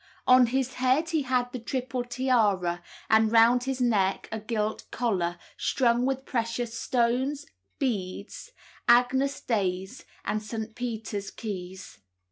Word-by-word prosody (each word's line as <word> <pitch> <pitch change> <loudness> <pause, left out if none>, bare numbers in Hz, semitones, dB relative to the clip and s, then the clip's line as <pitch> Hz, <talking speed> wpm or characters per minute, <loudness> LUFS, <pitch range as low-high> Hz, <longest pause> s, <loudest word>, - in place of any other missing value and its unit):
On 255 -1 +7
his 260 +1 -1
head 265 +6 +3
he 320 -2 +1
had 250 -2 0
the 250 - -5
triple 255 +1 -3
tiara, 220 -9 +1 0.3
and 220 0 +4
round 235 +2 +5
his 265 -1 -2
neck 205 -6 +1
a 220 - -3
gilt 215 0 -3
collar, 180 -8 -1 0.2
strung 245 -1 +2
with 265 0 -2
precious 230 -1 -2
stones, 255 +4 0 0.3
beads, 205 - -3 0.4
Agnus 255 +3 +3
Dei's, 190 -4 -2 0.2
and 215 - -1
St. 220 +1 -5
Peter's 220 -4 -4
keys. 190 - -7
235 Hz, 125 wpm, -27 LUFS, 215-255 Hz, 0.4 s, On